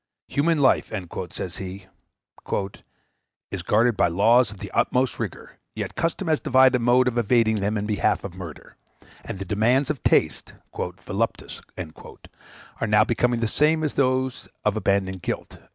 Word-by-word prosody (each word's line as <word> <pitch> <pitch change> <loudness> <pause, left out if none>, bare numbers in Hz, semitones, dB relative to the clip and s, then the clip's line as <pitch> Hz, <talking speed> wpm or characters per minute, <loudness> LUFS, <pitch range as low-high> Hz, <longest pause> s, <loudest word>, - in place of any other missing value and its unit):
"Human 160 +3 +2
life," 135 -3 +3 0.4
says 90 -1 -6
he, 95 +1 -7 1.7
"is - - -4
guarded 115 +2 +2
by - - +3
laws 110 +7 +4
of 105 - -10
the - - -8
uttermost 125 0 +1
rigor, - - -6 0.2
yet - - -4
custom 165 +3 -2
has 155 -2 +2
devised 130 0 +4
a 125 - +2
mode 125 +2 +4
of 120 -1 +1
evading 115 -1 +3
them 105 +2 -1
in 105 - -2
behalf 105 -1 0
of 100 - -6
murder; 90 -5 -10 0.5
and - - -6
the 95 - -5
demands 120 +9 +2
of 145 - -6
taste - - +1 0.2
(voluptas) - - -4 1.2
are 115 - -1
now 105 0 +5
become 120 +1 +1
the 115 - 0
same 155 +6 +2
as 150 - -1
those 130 -1 0 0.2
of 105 0 +2
abandoned 95 -3 0
guilt." - - -5
115 Hz, 155 wpm, -24 LUFS, 100-130 Hz, 1.7 s, now